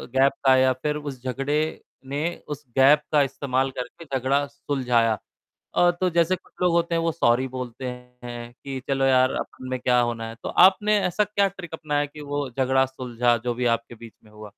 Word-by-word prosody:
Gap 135 Hz, +1 st, +5 dB
का 130 Hz, 0 st, +7 dB
या 130 Hz, 0 st, +4 dB
फिर 150 Hz, +4 st, -2 dB
उस 140 Hz, -4 st, -7 dB
झगड़े 135 Hz, +4 st, -1 dB, 0.5 s
ने 145 Hz, +4 st, -2 dB, 0.2 s
उस 150 Hz, 0 st, -6 dB
गैप 140 Hz, +3 st, +6 dB
का 150 Hz, -1 st, +5 dB
इस्तेमाल 135 Hz, -1 st, -1 dB
करके 165 Hz, +6 st, -7 dB
झगड़ा 140 Hz, +3 st, +1 dB
सुलझाया। 125 Hz, -6 st, 0 dB, 0.6 s
अ, 175 Hz, 0 st, +5 dB
तो 180 Hz, +1 st, -1 dB
जैसे 170 Hz, +2 st, +2 dB
कुछ 185 Hz, -, -20 dB
लोग 180 Hz, -1 st, +3 dB
होते 170 Hz, 0 st, +1 dB
हैं 165 Hz, -, +1 dB
वो 165 Hz, 0 st, +1 dB
सॉरी 130 Hz, -5 st, +2 dB
बोलते 125 Hz, 0 st, -6 dB
हैं, 125 Hz, -1 st, -8 dB
कि 135 Hz, +1 st, -7 dB
चलो 135 Hz, -1 st, +1 dB
यार 130 Hz, 0 st, +4 dB
अपन 130 Hz, -, -7 dB
में 130 Hz, -1 st, -2 dB
क्या 125 Hz, 0 st, +3 dB
होना 115 Hz, -1 st, -2 dB
है। 115 Hz, -, -9 dB
तो -, -, -3 dB
आपने 205 Hz, +3 st, +5 dB
ऐसा 210 Hz, +4 st, +1 dB
क्या 200 Hz, -1 st, +1 dB
ट्रिक 180 Hz, -4 st, -9 dB
अपनाया 150 Hz, -2 st, -1 dB
कि 150 Hz, +1 st, -11 dB
वो 145 Hz, -1 st, -3 dB
झगड़ा 130 Hz, +1 st, +2 dB
सुलझा 125 Hz, -2 st, 0 dB
जो 120 Hz, -, 0 dB
भी 125 Hz, +1 st, -2 dB
आपके 115 Hz, +1 st, -15 dB
बीच 115 Hz, 0 st, -12 dB
में 105 Hz, -, -20 dB
हुआ? 105 Hz, -1 st, -11 dB
135 Hz, 200 wpm, -24 LUFS, 125-150 Hz, 0.6 s, का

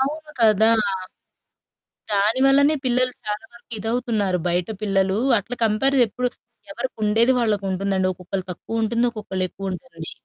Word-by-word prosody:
అవును 300 Hz, +3 st, -2 dB
కదా! 220 Hz, 0 st, +5 dB, 1.4 s
దానివల్లనే 270 Hz, +8 st, +4 dB
పిల్లలు 250 Hz, 0 st, +1 dB
చాలా 210 Hz, +5 st, -3 dB
వరకు 235 Hz, 0 st, -17 dB
ఇదవుతున్నారు. 220 Hz, -4 st, 0 dB
బయట 175 Hz, +2 st, 0 dB
పిల్లలు 195 Hz, -1 st, +1 dB, 0.2 s
అట్లా 240 Hz, +5 st, -6 dB
కంపారిజ 260 Hz, +6 st, +2 dB
ఎప్పుడు, 250 Hz, +2 st, -1 dB, 0.4 s
ఎవరికుండేది 230 Hz, +1 st, +1 dB
వాళ్ళకుంటుందండి. 195 Hz, -3 st, 0 dB
ఒక్కొక్కళ్ళకి 185 Hz, +1 st, -5 dB
తక్కువుంటుంది. 225 Hz, +5 st, -1 dB
ఒక్కొక్కళ్ళ 200 Hz, -4 st, -4 dB
ఎక్కువ 195 Hz, +1 st, -6 dB
ఉంటుంది. 165 Hz, -4 st, -8 dB
215 Hz, 110 wpm, -22 LUFS, 195-250 Hz, 1.4 s, కదా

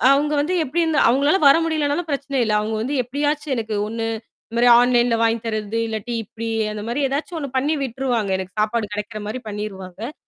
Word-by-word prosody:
அங்க 295 Hz, +1 st, 0 dB
வந்து 340 Hz, +6 st, -1 dB
எப்படி 335 Hz, +6 st, 0 dB
இருந்து 320 Hz, -2 st, +2 dB
அவங்களால 285 Hz, +9 st, +3 dB
வர 275 Hz, +3 st, +7 dB
முடியலனாலும் 315 Hz, +1 st, -1 dB
பிரச்சனை 280 Hz, -1 st, -1 dB
இல்ல. 215 Hz, -, 0 dB
அவுங்க 220 Hz, +1 st, -2 dB
வந்து 275 Hz, +5 st, -2 dB
எப்படியாச்சு 290 Hz, +4 st, -1 dB
எனக்கு 220 Hz, -1 st, -3 dB
ஒண்ணு 225 Hz, 0 st, -3 dB, 0.4 s
இந்த -, -, -7 dB
மாரி 245 Hz, -, +6 dB
ஆன்லைன்ல 245 Hz, -1 st, +3 dB
வாங்கி 230 Hz, 0 st, +2 dB
தரது 215 Hz, 0 st, -2 dB
இல்லாட்டி 220 Hz, +2 st, -4 dB
இப்படி 230 Hz, +2 st, -7 dB, 0.2 s
அந்த 210 Hz, -1 st, -5 dB
மாரி 250 Hz, +5 st, -1 dB
ஏதாச்சும் 305 Hz, +5 st, -3 dB
ஒண்ணு 280 Hz, -3 st, -4 dB
பண்ணி 290 Hz, +4 st, +1 dB
விட்டுருவாங்க. 245 Hz, -5 st, -1 dB
எனக்கு 190 Hz, +2 st, -7 dB
சாப்பாடு 215 Hz, -1 st, -1 dB
கிடைக்கிற 210 Hz, +1 st, -5 dB
மாரி 225 Hz, +4 st, -4 dB
பண்ணிருவாங்க. 205 Hz, -, -6 dB
240 Hz, 185 wpm, -21 LUFS, 215-285 Hz, 0.4 s, வர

